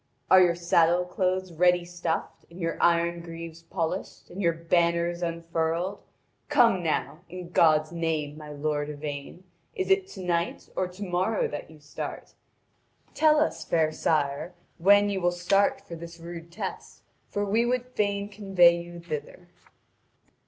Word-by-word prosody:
Are 185 Hz, 0 st, +9 dB
your 175 Hz, -2 st, +4 dB
saddle 170 Hz, 0 st, +3 dB
cloths 185 Hz, 0 st, -1 dB
ready 175 Hz, +1 st, +3 dB
stuffed, 175 Hz, -2 st, -4 dB
and 170 Hz, +2 st, -13 dB
your 165 Hz, -1 st, -1 dB
iron 170 Hz, 0 st, +2 dB
greaves 165 Hz, -1 st, -8 dB
polished, 165 Hz, +2 st, -4 dB
and 190 Hz, -, -5 dB
your 170 Hz, -3 st, +3 dB
banners 170 Hz, +1 st, +1 dB
unfurled? 170 Hz, +2 st, -2 dB, 0.5 s
Come 240 Hz, -10 st, +4 dB
now, 160 Hz, -1 st, -1 dB
in 180 Hz, 0 st, -8 dB
God's 155 Hz, -2 st, +4 dB
name, 160 Hz, -3 st, -2 dB
my 150 Hz, -1 st, -10 dB
lord 145 Hz, 0 st, -2 dB
Yvain, 145 Hz, +3 st, -6 dB, 0.3 s
is 380 Hz, 0 st, -1 dB
it 385 Hz, 0 st, +3 dB
to 195 Hz, -, -9 dB
night 170 Hz, -1 st, -2 dB
or 185 Hz, -, 0 dB
to 185 Hz, +3 st, -8 dB
morrow 185 Hz, +4 st, 0 dB
that 145 Hz, -, -6 dB
you 160 Hz, -1 st, -15 dB
start? 145 Hz, 0 st, -7 dB, 0.8 s
Tell 305 Hz, -1 st, +4 dB
us, 310 Hz, -, 0 dB
fair 160 Hz, -2 st, +1 dB
sire, 155 Hz, +2 st, -1 dB, 0.2 s
when 205 Hz, +3 st, +6 dB
you 195 Hz, -1 st, -2 dB
will 175 Hz, -, +3 dB
start 195 Hz, +8 st, +2 dB
for -, -, -11 dB
this 170 Hz, +1 st, -10 dB
rude 170 Hz, 0 st, -9 dB
test, 170 Hz, -, -7 dB, 0.3 s
for 205 Hz, 0 st, -1 dB
we 215 Hz, +4 st, +2 dB
would 245 Hz, +1 st, 0 dB
fain 200 Hz, -4 st, -1 dB
convoy 190 Hz, -4 st, +4 dB
you 175 Hz, 0 st, -10 dB
thither. 170 Hz, +2 st, -7 dB
170 Hz, 150 wpm, -27 LUFS, 165-185 Hz, 0.8 s, Are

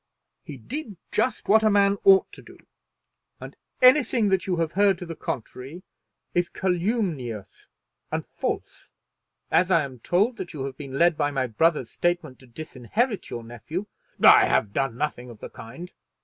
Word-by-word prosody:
He 145 Hz, -, -9 dB
did 220 Hz, -, -7 dB
just 255 Hz, -, -1 dB
what 220 Hz, +2 st, +5 dB
a 215 Hz, -, +5 dB
man 200 Hz, -1 st, +3 dB
ought 195 Hz, -1 st, +6 dB
to -, -, -12 dB
do, -, -, -15 dB, 0.8 s
and -, -, -10 dB, 0.3 s
anything 255 Hz, -4 st, +5 dB
that 190 Hz, -1 st, 0 dB
you 185 Hz, -, +1 dB
have 165 Hz, -2 st, -1 dB
heard 200 Hz, 0 st, +3 dB
to 180 Hz, -, -7 dB
the 165 Hz, -1 st, -7 dB
contrary 135 Hz, +7 st, -6 dB, 0.5 s
is 175 Hz, 0 st, +1 dB
calumnious 175 Hz, -, -2 dB, 0.4 s
and -, -, -2 dB
false. -, -, -5 dB, 0.6 s
As 180 Hz, +1 st, +3 dB
I 170 Hz, -4 st, +4 dB
am 130 Hz, -3 st, -8 dB
told 205 Hz, -, +1 dB
that 175 Hz, -, -7 dB
you 140 Hz, -4 st, -5 dB
have 135 Hz, -1 st, -6 dB
been 135 Hz, -1 st, -7 dB
led 170 Hz, -1 st, +3 dB
by 145 Hz, -1 st, +2 dB
my 135 Hz, -2 st, -1 dB
brother's 130 Hz, +2 st, +1 dB
statement 175 Hz, -6 st, -2 dB
to 130 Hz, -, -17 dB
disinherit 160 Hz, -, -3 dB
your 120 Hz, -, -6 dB
nephew 120 Hz, -, -6 dB, 0.3 s
" -, -, -39 dB
"I -, -, +8 dB
have 100 Hz, -1 st, +1 dB
done 135 Hz, -4 st, -1 dB
nothing 125 Hz, -4 st, -3 dB
of 115 Hz, -, -11 dB
the -, -, -9 dB
kind." 135 Hz, +11 st, -10 dB
170 Hz, 175 wpm, -25 LUFS, 130-195 Hz, 0.8 s, I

